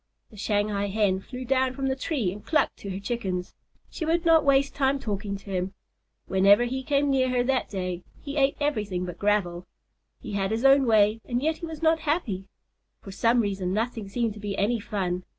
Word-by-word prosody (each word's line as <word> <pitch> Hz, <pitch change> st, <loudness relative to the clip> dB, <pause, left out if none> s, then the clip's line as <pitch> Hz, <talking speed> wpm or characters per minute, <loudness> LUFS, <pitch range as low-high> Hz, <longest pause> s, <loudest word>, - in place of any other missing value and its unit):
The -, -, -14 dB
Shanghai 205 Hz, 0 st, 0 dB
Hen 200 Hz, -2 st, +1 dB
flew 255 Hz, +5 st, -8 dB
down 260 Hz, 0 st, +1 dB
from 270 Hz, -, -3 dB
the 265 Hz, 0 st, +1 dB
tree 260 Hz, -, -1 dB
and 205 Hz, +2 st, -9 dB
clucked 310 Hz, -, +1 dB
to 200 Hz, -, -8 dB
her 190 Hz, 0 st, -4 dB
Chickens. 195 Hz, -5 st, -3 dB, 0.4 s
She -, -, -5 dB
would 335 Hz, +2 st, +1 dB
not 325 Hz, -2 st, +6 dB
waste 275 Hz, 0 st, +3 dB
time 275 Hz, 0 st, +1 dB
talking 205 Hz, -4 st, -3 dB
to 200 Hz, 0 st, -11 dB
him. 185 Hz, +1 st, -2 dB, 0.5 s
Whenever 200 Hz, +4 st, +5 dB
he 260 Hz, +2 st, -2 dB
came 280 Hz, +1 st, +1 dB
near 260 Hz, -1 st, +2 dB
her 250 Hz, -1 st, +1 dB
that 260 Hz, +1 st, 0 dB
day, 185 Hz, -3 st, -3 dB, 0.2 s
he 280 Hz, 0 st, -7 dB
ate 275 Hz, -1 st, +2 dB
everything 210 Hz, -11 st, -1 dB
but 180 Hz, -, -7 dB
gravel. 185 Hz, -4 st, 0 dB, 0.5 s
He 225 Hz, -, -8 dB
had 195 Hz, -1 st, -1 dB
his 225 Hz, +4 st, -1 dB
own 270 Hz, -1 st, +6 dB
way 215 Hz, 0 st, +4 dB
and 245 Hz, -1 st, -1 dB
yet 315 Hz, +4 st, 0 dB
he 335 Hz, -, -6 dB
was 320 Hz, 0 st, -8 dB
not 320 Hz, 0 st, +4 dB
happy. 290 Hz, -, -1 dB, 0.6 s
For 195 Hz, -, -8 dB
some 230 Hz, +5 st, +3 dB
reason, 195 Hz, -3 st, -2 dB
nothing 225 Hz, -1 st, -2 dB
seemed 230 Hz, +1 st, -1 dB
to 210 Hz, -, -11 dB
be 205 Hz, -1 st, -4 dB
any 225 Hz, +4 st, +1 dB
fun. 185 Hz, -4 st, -2 dB
220 Hz, 205 wpm, -26 LUFS, 195-270 Hz, 0.6 s, not